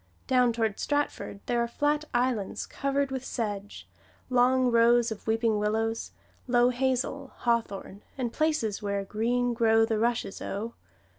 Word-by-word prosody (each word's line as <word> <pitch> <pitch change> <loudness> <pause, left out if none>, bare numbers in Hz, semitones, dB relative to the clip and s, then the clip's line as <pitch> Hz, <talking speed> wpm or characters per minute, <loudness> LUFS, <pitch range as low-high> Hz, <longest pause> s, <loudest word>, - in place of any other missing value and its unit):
Down 250 -2 +3
toward 225 -3 -1
Stratford 290 -8 -2
there 240 -1 +1
are 235 - 0
flat 295 +5 0
islands 240 -5 0
covered 275 0 -1
with 265 -1 -3
sedge, 205 -5 -4 0.4
long 250 0 +4
rows 235 0 +4
of 220 - -7
weeping 225 -1 +2
willows, 225 +2 -1 0.4
low 245 0 +4
hazel, 260 +2 -1
hawthorn, 215 -4 -2 0.2
and 245 -3 -2
places 305 -10 0
where 200 -1 -2
"Green 240 +4 0
Grow 225 -1 +4
the 225 -1 -1
Rushes, 235 -3 -1
O." 220 +4 -4
235 Hz, 140 wpm, -28 LUFS, 220-255 Hz, 0.4 s, long